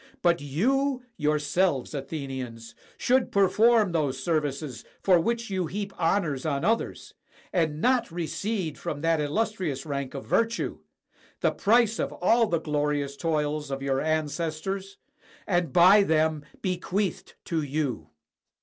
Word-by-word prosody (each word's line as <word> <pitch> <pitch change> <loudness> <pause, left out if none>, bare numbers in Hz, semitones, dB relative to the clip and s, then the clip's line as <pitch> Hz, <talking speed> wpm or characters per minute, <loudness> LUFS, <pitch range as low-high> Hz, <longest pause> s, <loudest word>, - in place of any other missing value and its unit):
But 170 -2 +3
you 255 - 0
yourselves, 150 - +1
Athenians, 130 -6 -6 0.2
should 255 0 +2
perform 205 +2 +4
those 145 -6 0
services 145 -3 -2 0.2
for 185 -3 +5
which 235 +4 -1
you 185 -3 -1
heap 200 +3 -4
honors 165 -5 0
on 140 -3 -1
others, 225 +2 -1 0.4
and 160 -4 +1
not 245 0 +2
recede 170 +1 -3
from 145 - -4
that 165 -1 +2
illustrious 160 -3 -1
rank 140 -2 -4
of 135 - -6
virtue, 230 0 0 0.6
the - - +3
price 230 +1 +3
of - - -1
all 230 0 +3
the 170 -5 0
glorious 145 -2 -1
toils 150 -2 -1
of 135 0 -4
your 135 0 0
ancestors, 160 +5 -2 0.5
and 175 -3 0
by 185 +4 +7
them 155 -4 +1 0.2
bequeathed 185 0 -2
to 165 -2 -1
you. 140 - -2
165 Hz, 130 wpm, -27 LUFS, 145-195 Hz, 0.6 s, by